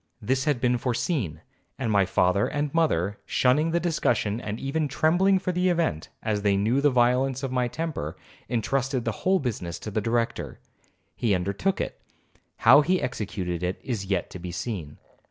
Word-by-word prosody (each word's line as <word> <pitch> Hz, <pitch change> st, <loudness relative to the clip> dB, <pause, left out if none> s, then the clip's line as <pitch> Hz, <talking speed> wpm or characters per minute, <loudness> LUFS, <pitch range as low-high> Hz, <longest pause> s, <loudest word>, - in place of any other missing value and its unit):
This 130 Hz, +4 st, 0 dB
had 145 Hz, -5 st, +1 dB
been 125 Hz, 0 st, +1 dB
foreseen, 120 Hz, -, -1 dB, 0.4 s
and 125 Hz, -5 st, -1 dB
my 100 Hz, -3 st, +3 dB
father 95 Hz, +2 st, +2 dB
and 145 Hz, -1 st, -2 dB
mother, 105 Hz, -, +1 dB
shunning 145 Hz, +6 st, +2 dB
the 170 Hz, +1 st, +1 dB
discussion 120 Hz, -10 st, 0 dB
and 105 Hz, -1 st, -4 dB
even 150 Hz, +3 st, -1 dB
trembling 175 Hz, +7 st, +3 dB
for 185 Hz, 0 st, -1 dB
the 180 Hz, +1 st, +1 dB
event, 165 Hz, -, 0 dB
as 105 Hz, -2 st, 0 dB
they 100 Hz, -1 st, +2 dB
knew 115 Hz, +7 st, +2 dB
the 145 Hz, -, +5 dB
violence 125 Hz, +1 st, +2 dB
of 135 Hz, -, -2 dB
my 125 Hz, -1 st, +1 dB
temper, 140 Hz, -, -4 dB, 0.3 s
intrusted 130 Hz, +2 st, -1 dB
the 115 Hz, -, +1 dB
whole 190 Hz, +1 st, +3 dB
business 105 Hz, -, -3 dB
to 105 Hz, -, -7 dB
the 110 Hz, -, 0 dB
Director. 115 Hz, +2 st, -1 dB, 0.6 s
He 110 Hz, -5 st, +1 dB
undertook 100 Hz, -, -1 dB
it,—how 145 Hz, -, +1 dB
he 180 Hz, +4 st, +2 dB
executed 95 Hz, -8 st, -3 dB
it 90 Hz, +1 st, -2 dB
is 110 Hz, -6 st, -3 dB
yet 95 Hz, -3 st, -1 dB
to 90 Hz, -, -7 dB
be 90 Hz, 0 st, -6 dB
seen. 90 Hz, -6 st, -5 dB
120 Hz, 175 wpm, -26 LUFS, 100-145 Hz, 0.6 s, the